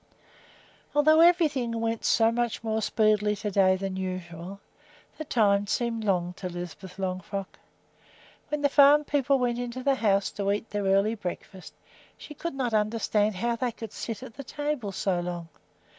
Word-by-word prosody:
Although 310 Hz, +2 st, +5 dB
everything 295 Hz, -10 st, +3 dB
went 225 Hz, 0 st, -2 dB
so 225 Hz, 0 st, +4 dB
much 235 Hz, -1 st, -2 dB
more 220 Hz, 0 st, -1 dB
speedily 210 Hz, -1 st, +2 dB
to 205 Hz, +1 st, -4 dB
day 190 Hz, -1 st, +4 dB
than 190 Hz, 0 st, -4 dB
usual, 185 Hz, 0 st, -6 dB, 0.6 s
the -, -, -3 dB
time 205 Hz, -6 st, +2 dB
seemed 230 Hz, 0 st, -1 dB
long 180 Hz, -3 st, 0 dB
to 185 Hz, -, -5 dB
Lisbeth 175 Hz, +1 st, -8 dB
Longfrock. 190 Hz, +1 st, -4 dB, 0.9 s
When 300 Hz, -1 st, -2 dB
the -, -, +6 dB
farm 285 Hz, +1 st, +6 dB
people 280 Hz, -2 st, +1 dB
went 245 Hz, -2 st, 0 dB
into 245 Hz, +1 st, -5 dB
the 275 Hz, -, +3 dB
house 200 Hz, -6 st, +1 dB
to 200 Hz, -1 st, -1 dB
eat 205 Hz, +2 st, -3 dB
their 205 Hz, -1 st, -2 dB
early 195 Hz, +3 st, +3 dB
breakfast, 190 Hz, -2 st, -7 dB, 0.4 s
she 300 Hz, -, -10 dB
could 335 Hz, +1 st, -5 dB
not 250 Hz, -4 st, -2 dB
understand 215 Hz, -1 st, +1 dB
how 235 Hz, +5 st, -1 dB
they 245 Hz, +1 st, -1 dB
could 225 Hz, -2 st, -9 dB
sit 225 Hz, -3 st, -5 dB
at -, -, -10 dB
the 275 Hz, -, -8 dB
table 290 Hz, -6 st, -3 dB
so 190 Hz, -1 st, -1 dB
long. 175 Hz, -1 st, -5 dB
215 Hz, 165 wpm, -27 LUFS, 195-245 Hz, 0.9 s, the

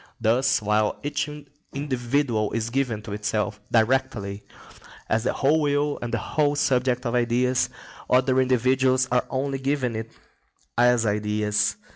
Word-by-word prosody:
Thus, 120 Hz, +1 st, +2 dB
while 105 Hz, 0 st, +1 dB
each 150 Hz, +1 st, -2 dB, 0.5 s
individual 130 Hz, -5 st, -1 dB
is 115 Hz, 0 st, -2 dB
given 120 Hz, -5 st, -1 dB
to 110 Hz, -3 st, -6 dB
itself 105 Hz, 0 st, -2 dB
directly 115 Hz, -4 st, +1 dB, 0.7 s
as 110 Hz, +2 st, 0 dB
the -, -, +1 dB
whole 150 Hz, +3 st, +2 dB
will 145 Hz, 0 st, 0 dB
and 120 Hz, -, -4 dB
the 115 Hz, -, 0 dB
whole 145 Hz, +6 st, 0 dB
subject 125 Hz, -3 st, +1 dB
of 120 Hz, -, -1 dB
ideas, 125 Hz, +1 st, +1 dB, 0.4 s
other 130 Hz, +1 st, +3 dB
individuals 130 Hz, +1 st, +2 dB
are 125 Hz, -, +1 dB
only 135 Hz, +1 st, -2 dB
given 135 Hz, -3 st, -1 dB
it 110 Hz, +1 st, -5 dB, 0.6 s
as 120 Hz, -1 st, +3 dB
ideas. 105 Hz, -1 st, 0 dB
125 Hz, 135 wpm, -24 LUFS, 110-130 Hz, 0.7 s, other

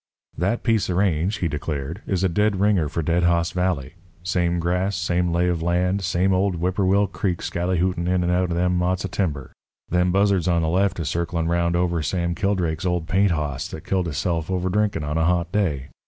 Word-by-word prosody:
"That 100 Hz, +8 st, -1 dB
piece 115 Hz, -5 st, +1 dB
of 90 Hz, -, 0 dB
range," 95 Hz, +1 st, +1 dB
he 90 Hz, -, -1 dB
declared, 75 Hz, +3 st, -4 dB
"is 95 Hz, -2 st, 0 dB
a -, -, +4 dB
dead 105 Hz, +2 st, +1 dB
ringer 100 Hz, -7 st, +2 dB
for 80 Hz, +1 st, -2 dB
Dead 85 Hz, +3 st, +1 dB
Hoss 85 Hz, -1 st, +2 dB
Valley. 90 Hz, -6 st, -1 dB, 0.3 s
Same 90 Hz, -1 st, 0 dB
grass, 90 Hz, +4 st, 0 dB
same 85 Hz, 0 st, 0 dB
lay 85 Hz, +1 st, +1 dB
of 85 Hz, -2 st, 0 dB
land, 90 Hz, +3 st, +1 dB
same 95 Hz, +1 st, +1 dB
old 95 Hz, 0 st, +1 dB
Whipperwill 95 Hz, +3 st, +2 dB
Creek 90 Hz, -3 st, -1 dB
skallyhootin' 90 Hz, 0 st, -1 dB
in 90 Hz, 0 st, +1 dB
and 85 Hz, -, +1 dB
out 90 Hz, 0 st, +1 dB
of 85 Hz, -, -1 dB
them 90 Hz, 0 st, +1 dB
motts 90 Hz, +2 st, 0 dB
of 95 Hz, -, -5 dB
timber. 75 Hz, -10 st, -2 dB, 0.4 s
Them 90 Hz, +1 st, +2 dB
buzzards 100 Hz, -2 st, +2 dB
on 85 Hz, -2 st, +2 dB
the 80 Hz, -, 0 dB
left 95 Hz, +2 st, +1 dB
is 80 Hz, -, -2 dB
circlin' 85 Hz, 0 st, -1 dB
'round 85 Hz, 0 st, +1 dB
over 85 Hz, -1 st, +1 dB
Sam 85 Hz, +2 st, -1 dB
Kildrake's 90 Hz, -4 st, -1 dB
old 90 Hz, -2 st, -1 dB
paint 95 Hz, +3 st, +3 dB
hoss 75 Hz, -5 st, -2 dB
that 80 Hz, -, -9 dB
killed 95 Hz, -2 st, 0 dB
hisself 80 Hz, +1 st, -2 dB
over 95 Hz, 0 st, -1 dB
drinkin' 105 Hz, -4 st, 0 dB
on 75 Hz, +2 st, -1 dB
a 80 Hz, -, +2 dB
hot 85 Hz, -1 st, +1 dB
day. 75 Hz, -10 st, -1 dB
90 Hz, 210 wpm, -23 LUFS, 85-95 Hz, 0.4 s, a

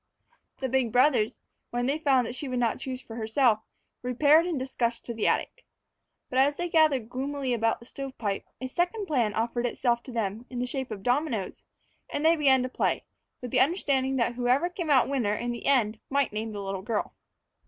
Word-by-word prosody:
The 265 Hz, -, 0 dB
big 260 Hz, -2 st, +1 dB
brothers, 250 Hz, -3 st, +3 dB, 0.3 s
when 245 Hz, 0 st, -1 dB
they 280 Hz, +4 st, 0 dB
found 270 Hz, -5 st, +3 dB
that 235 Hz, -, -5 dB
she 275 Hz, +3 st, -5 dB
would 255 Hz, -1 st, -2 dB
not 235 Hz, -2 st, +1 dB
choose 260 Hz, -1 st, -5 dB
for 225 Hz, -, -9 dB
herself, 225 Hz, 0 st, +2 dB, 0.4 s
repaired 290 Hz, +7 st, +4 dB
in 340 Hz, -4 st, -1 dB
disgust 240 Hz, -3 st, -2 dB
to 235 Hz, -, -4 dB
the 220 Hz, -, 0 dB
attic. -, -, -1 dB, 0.6 s
But 255 Hz, -, 0 dB
as 285 Hz, +2 st, +4 dB
they 350 Hz, +2 st, -3 dB
gathered 305 Hz, -8 st, +3 dB
gloomily 265 Hz, +1 st, -2 dB
about 225 Hz, -1 st, +1 dB
the 235 Hz, -, -14 dB
stovepipe, 245 Hz, -7 st, -4 dB, 0.2 s
a 260 Hz, -, -4 dB
second 355 Hz, -, -1 dB
plan 240 Hz, -, 0 dB
offered 235 Hz, +2 st, 0 dB
itself 235 Hz, 0 st, 0 dB
to 260 Hz, -, -8 dB
them 225 Hz, +1 st, -3 dB
in 250 Hz, -, -7 dB
the 245 Hz, -, 0 dB
shape 260 Hz, +1 st, -3 dB
of 210 Hz, -3 st, -6 dB
the -, -, -19 dB
dominoes, 245 Hz, -6 st, -1 dB, 0.5 s
and 295 Hz, -, -2 dB
they 330 Hz, +1 st, +6 dB
began 270 Hz, -4 st, +4 dB
to -, -, -1 dB
play, -, -, -1 dB, 0.4 s
with 245 Hz, -, -5 dB
the -, -, +3 dB
understanding 270 Hz, -4 st, +2 dB
that 240 Hz, -1 st, +1 dB
whoever 250 Hz, +8 st, +1 dB
came 345 Hz, -3 st, -4 dB
out 270 Hz, -4 st, +5 dB
winner 245 Hz, -7 st, 0 dB
in 240 Hz, +3 st, -2 dB
the 240 Hz, -, -5 dB
end 225 Hz, -6 st, +3 dB
might 275 Hz, -5 st, +1 dB
name 220 Hz, +1 st, -3 dB
the 205 Hz, -1 st, -5 dB
little 195 Hz, -1 st, -4 dB
girl. 215 Hz, +2 st, -2 dB
255 Hz, 205 wpm, -27 LUFS, 230-280 Hz, 0.6 s, they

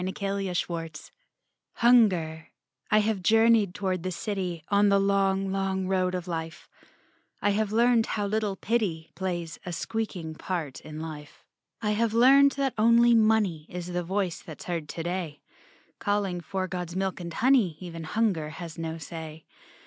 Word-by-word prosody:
DAY 185 Hz, -, -2 dB, 0.5 s
DREAMS 165 Hz, -3 st, -4 dB, 0.6 s
HUNGER 185 Hz, -10 st, +3 dB, 0.4 s
I 215 Hz, -, +5 dB
have 210 Hz, -2 st, -1 dB
journeyed 225 Hz, -1 st, +4 dB
toward 190 Hz, -3 st, -1 dB
the 185 Hz, -, -3 dB
city 180 Hz, -4 st, -3 dB
On 205 Hz, 0 st, +4 dB
the 200 Hz, -, +4 dB
long, 195 Hz, -1 st, +1 dB
long 190 Hz, -1 st, -1 dB
road 185 Hz, -1 st, 0 dB
of 180 Hz, 0 st, -4 dB
Life, 165 Hz, -1 st, -5 dB, 0.7 s
I 205 Hz, -, +2 dB
have 210 Hz, 0 st, 0 dB
learned 235 Hz, 0 st, +3 dB
how 205 Hz, -2 st, -1 dB
little 210 Hz, -1 st, -1 dB
Pity 190 Hz, -7 st, -1 dB
Plays 175 Hz, -3 st, -4 dB
a 180 Hz, -, -5 dB
speaking 180 Hz, -4 st, -4 dB
part 160 Hz, -4 st, -4 dB
in 155 Hz, 0 st, -8 dB
life. 150 Hz, -2 st, -9 dB, 0.4 s
I 210 Hz, -, +1 dB
have 225 Hz, +1 st, 0 dB
learned 275 Hz, +4 st, +6 dB
that 275 Hz, -2 st, -1 dB
only 235 Hz, +2 st, +6 dB
Money 215 Hz, -8 st, +2 dB
Is 180 Hz, 0 st, -6 dB
the 175 Hz, -, 0 dB
voice 185 Hz, -1 st, -2 dB
that's 160 Hz, -, -10 dB
heard 165 Hz, -4 st, -3 dB
today, 170 Hz, -2 st, -4 dB, 0.6 s
Calling 200 Hz, -4 st, -1 dB
for 190 Hz, +2 st, -3 dB
God's 180 Hz, -1 st, -5 dB
milk 190 Hz, 0 st, -1 dB
and 170 Hz, -1 st, -6 dB
honey, 235 Hz, -, +3 dB
Even 165 Hz, -3 st, -7 dB
Hunger 185 Hz, -5 st, 0 dB
has 165 Hz, 0 st, -8 dB
no 165 Hz, 0 st, -4 dB
say. 160 Hz, -1 st, -8 dB
190 Hz, 155 wpm, -27 LUFS, 165-215 Hz, 0.7 s, learned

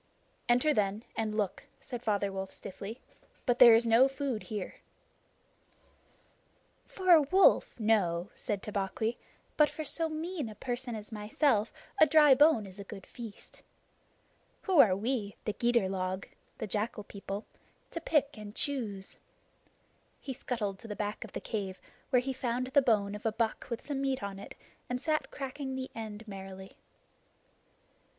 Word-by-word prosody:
"Enter, 250 Hz, +6 st, +4 dB
then, 205 Hz, -1 st, 0 dB
and 215 Hz, -1 st, -1 dB
look," 205 Hz, -4 st, -1 dB
said 245 Hz, -2 st, -6 dB
Father 205 Hz, -3 st, 0 dB
Wolf 190 Hz, 0 st, -4 dB
stiffly, 205 Hz, +5 st, -7 dB, 0.5 s
"but 245 Hz, -2 st, +2 dB
there 235 Hz, -2 st, +10 dB
is 230 Hz, +1 st, +3 dB
no 230 Hz, +3 st, +6 dB
food 270 Hz, -4 st, -3 dB
here." 210 Hz, -4 st, -5 dB, 2.1 s
"For 370 Hz, -1 st, +1 dB
a 330 Hz, -3 st, +9 dB
wolf, 370 Hz, -2 st, +4 dB
no," 200 Hz, -5 st, +2 dB
said 205 Hz, -5 st, -3 dB
Tabaqui, 210 Hz, +3 st, -2 dB, 0.4 s
"but 300 Hz, -1 st, +6 dB
for 310 Hz, -, -5 dB
so 325 Hz, +3 st, +1 dB
mean 315 Hz, -4 st, -3 dB
a 215 Hz, -, -9 dB
person 245 Hz, 0 st, -4 dB
as 215 Hz, 0 st, -8 dB
myself 215 Hz, +2 st, +1 dB, 0.3 s
a 315 Hz, -, +8 dB
dry 300 Hz, -3 st, +7 dB
bone 290 Hz, -6 st, +5 dB
is 195 Hz, +1 st, -9 dB
a -, -, -5 dB
good 195 Hz, -1 st, -10 dB
feast. 230 Hz, -4 st, -10 dB, 1.0 s
Who 375 Hz, -6 st, +3 dB
are 200 Hz, -9 st, +7 dB
we, 210 Hz, -1 st, -2 dB
the 210 Hz, -, -1 dB
Gidur 235 Hz, -4 st, +2 dB
log 185 Hz, 0 st, -3 dB, 0.3 s
[the -, -, -3 dB
jackal 210 Hz, +1 st, -2 dB
people], 200 Hz, +1 st, -6 dB, 0.5 s
to 335 Hz, -, -4 dB
pick 295 Hz, -3 st, +1 dB
and 210 Hz, -1 st, -9 dB
choose?" 215 Hz, -9 st, -3 dB, 1.0 s
He 270 Hz, -, -5 dB
scuttled 215 Hz, -6 st, -3 dB
to 230 Hz, -, -10 dB
the 210 Hz, -, -5 dB
back 210 Hz, +2 st, -3 dB
of 225 Hz, -, -11 dB
the -, -, -3 dB
cave, 195 Hz, -4 st, -4 dB, 0.3 s
where 250 Hz, -3 st, +4 dB
he 265 Hz, +1 st, -3 dB
found 250 Hz, -1 st, -1 dB
the 260 Hz, +2 st, +4 dB
bone 210 Hz, -5 st, +2 dB
of 210 Hz, -, -7 dB
a 225 Hz, -, +1 dB
buck 225 Hz, 0 st, -1 dB
with 235 Hz, 0 st, -4 dB
some 280 Hz, -2 st, -2 dB
meat 270 Hz, -4 st, -1 dB
on 195 Hz, -1 st, -5 dB
it, 200 Hz, -, -10 dB, 0.3 s
and 250 Hz, 0 st, -1 dB
sat 305 Hz, +2 st, 0 dB
cracking 270 Hz, -1 st, -5 dB
the 260 Hz, 0 st, -5 dB
end 220 Hz, -1 st, -7 dB
merrily. 190 Hz, -1 st, -8 dB
225 Hz, 160 wpm, -31 LUFS, 205-265 Hz, 2.1 s, there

